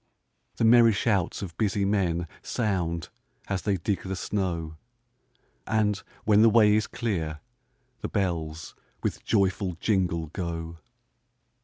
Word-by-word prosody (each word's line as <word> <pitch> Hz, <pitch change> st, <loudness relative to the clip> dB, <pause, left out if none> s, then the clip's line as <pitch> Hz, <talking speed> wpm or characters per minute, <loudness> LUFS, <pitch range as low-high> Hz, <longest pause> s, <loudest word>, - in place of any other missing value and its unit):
The -, -, +1 dB
merry 115 Hz, 0 st, +7 dB
shouts 100 Hz, -3 st, 0 dB
of 85 Hz, -4 st, -7 dB
busy 100 Hz, -2 st, +1 dB
men 90 Hz, -4 st, 0 dB
Sound, 90 Hz, -8 st, -1 dB, 0.4 s
as 100 Hz, -2 st, -1 dB
they 100 Hz, -2 st, 0 dB
dig 95 Hz, +3 st, -1 dB
the 95 Hz, 0 st, -4 dB
snow; 85 Hz, -5 st, -2 dB, 0.9 s
And, 105 Hz, -2 st, +1 dB, 0.2 s
when 105 Hz, 0 st, +5 dB
the 115 Hz, -, +7 dB
way 105 Hz, -1 st, +5 dB
is 110 Hz, 0 st, +2 dB
clear, 85 Hz, -10 st, -3 dB, 0.6 s
the -, -, -4 dB
bells 85 Hz, -5 st, -2 dB, 0.3 s
With -, -, -2 dB
joyful 95 Hz, -3 st, +1 dB
jingle, 85 Hz, -7 st, 0 dB
go. 85 Hz, -2 st, -4 dB
95 Hz, 125 wpm, -27 LUFS, 85-105 Hz, 0.9 s, merry